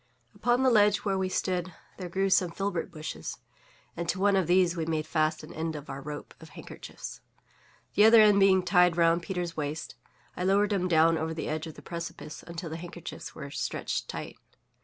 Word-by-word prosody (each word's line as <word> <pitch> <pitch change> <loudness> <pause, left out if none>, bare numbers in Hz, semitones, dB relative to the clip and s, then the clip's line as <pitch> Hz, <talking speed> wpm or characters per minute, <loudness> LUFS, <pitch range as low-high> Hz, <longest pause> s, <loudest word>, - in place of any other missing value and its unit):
Upon 245 +2 +1
the 260 - +5
ledge 210 -2 +4
where 195 -1 +1
we 190 0 0
stood 180 -2 -2 0.2
there 180 -2 -6
grew 195 +2 0
some 180 -1 +4
filbert 195 0 -3
bushes; 155 -2 -6 0.6
and 170 0 -4
to 185 - 0
one 200 0 +3
of 190 -4 +2
these 180 -1 +3
we 165 -2 -3
made 155 -1 -1
fast 155 -1 0
an 155 - -10
end 160 0 -3
of 150 -1 -7
our 135 0 -6
rope 150 +1 -7
of - - -13
handkerchiefs. - - -9 0.7
The 205 - +6
other 225 +1 +8
end 210 -2 +6
being 190 -1 +5
tied 180 -1 +4
round 170 0 +4
Peters' 175 -2 -4
waist, 150 +1 -4 0.4
I 180 - -3
lowered 200 +2 +3
him 185 -2 0
down 165 -1 +4
over 160 0 -3
the 160 - -4
edge 155 +1 -3
of 160 - -9
the - - -13
precipice 170 -2 -7
until 170 -1 -7
the 160 - -4
handkerchiefs 175 0 -8
were 140 -2 -8
stretched - - -3
tight. - - -7
175 Hz, 200 wpm, -28 LUFS, 160-195 Hz, 0.7 s, other